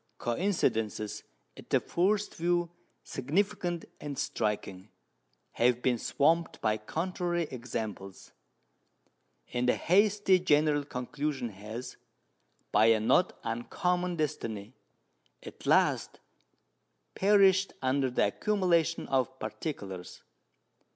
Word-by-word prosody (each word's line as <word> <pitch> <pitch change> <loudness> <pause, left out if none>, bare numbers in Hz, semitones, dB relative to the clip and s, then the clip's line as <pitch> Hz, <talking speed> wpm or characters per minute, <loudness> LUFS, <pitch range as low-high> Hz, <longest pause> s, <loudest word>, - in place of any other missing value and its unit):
Coincidences 115 - -1 0.3
at - - -14
the - - +4
first 200 +4 0
view 175 0 0 0.3
significant 175 - -1
and 145 -2 -6
striking 105 -3 -2 0.6
have 125 0 +2
been 125 -2 +2
swamped 165 +7 +1
by 110 -1 +1
contrary 175 - -2
examples; 110 -6 -6 1.2
and 125 0 +1
a - - +4
hasty 200 +1 +3
general 150 -3 +3
conclusion 140 -1 -3
has, 110 +4 -8 0.7
by 110 +2 +5
a 115 -1 +5
not 145 +12 +2
uncommon 180 +10 -1
destiny, 115 -9 -3 0.7
at - - -10
last - - +2 0.9
perished 195 -1 +4
under 130 0 +2
the 125 - +2
accumulation 170 - +1
of 130 -1 0
particulars. 105 - -6
140 Hz, 95 wpm, -30 LUFS, 115-175 Hz, 1.2 s, by